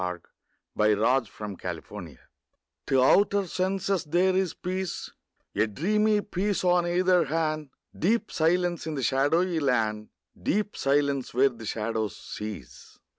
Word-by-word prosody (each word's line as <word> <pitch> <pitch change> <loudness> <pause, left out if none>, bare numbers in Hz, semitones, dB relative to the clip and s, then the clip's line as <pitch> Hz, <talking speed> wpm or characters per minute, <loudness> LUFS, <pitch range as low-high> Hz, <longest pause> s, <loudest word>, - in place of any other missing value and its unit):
fi4S] 90 - 0 0.7
II 105 0 +4
LA 120 +6 +3
FUITE 105 -1 -8
DE 90 - -2
LA - - -27
LUNE 80 -8 -10 0.7
TO 130 -1 +3
outer 200 +6 +4
senses 190 0 -1
there 180 +4 +2
is 190 -3 0
peace, 185 0 -4 0.4
A 105 +2 +2
dreamy 210 - +1
peace 200 0 -2
on 175 -1 +3
either 180 0 +3
hand, 155 -1 -1 0.3
Deep 215 +6 0
silence 175 +1 +1
in 155 - -3
the 135 - -3
shadowy 160 +7 +2
land, 110 -6 0 0.3
Deep 210 +1 0
silence 140 -2 0
where 135 +2 +5
the 115 -3 -10
shadows 110 0 -2
cease. 90 - -8
155 Hz, 140 wpm, -27 LUFS, 115-185 Hz, 0.7 s, where